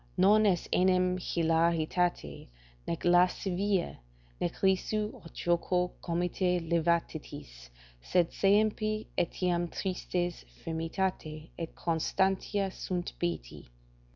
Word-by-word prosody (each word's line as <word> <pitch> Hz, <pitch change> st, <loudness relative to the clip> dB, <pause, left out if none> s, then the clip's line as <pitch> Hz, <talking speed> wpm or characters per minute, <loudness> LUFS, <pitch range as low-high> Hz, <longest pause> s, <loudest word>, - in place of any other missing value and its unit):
"Non 210 Hz, +3 st, +5 dB
est 180 Hz, -3 st, +1 dB
enim 185 Hz, 0 st, +3 dB
hilaritate, 165 Hz, -, 0 dB, 0.4 s
nec 170 Hz, -, -3 dB
lascivia, 180 Hz, +2 st, +2 dB, 0.4 s
nec 175 Hz, -, -1 dB
risu, 210 Hz, +3 st, +1 dB
aut 165 Hz, -, -13 dB
joco 180 Hz, +1 st, 0 dB
comite 180 Hz, +1 st, 0 dB
levitatis, 155 Hz, -, -2 dB, 0.3 s
sed 175 Hz, -, +1 dB
saepe 215 Hz, +1 st, +2 dB
etiam 175 Hz, 0 st, 0 dB
tristes 180 Hz, -1 st, -3 dB, 0.2 s
firmitate 165 Hz, -1 st, -3 dB
et 165 Hz, -1 st, -6 dB
constantia 190 Hz, +4 st, 0 dB
sunt 180 Hz, -1 st, -4 dB
beati." 175 Hz, -, -4 dB
175 Hz, 90 wpm, -30 LUFS, 170-190 Hz, 0.4 s, Non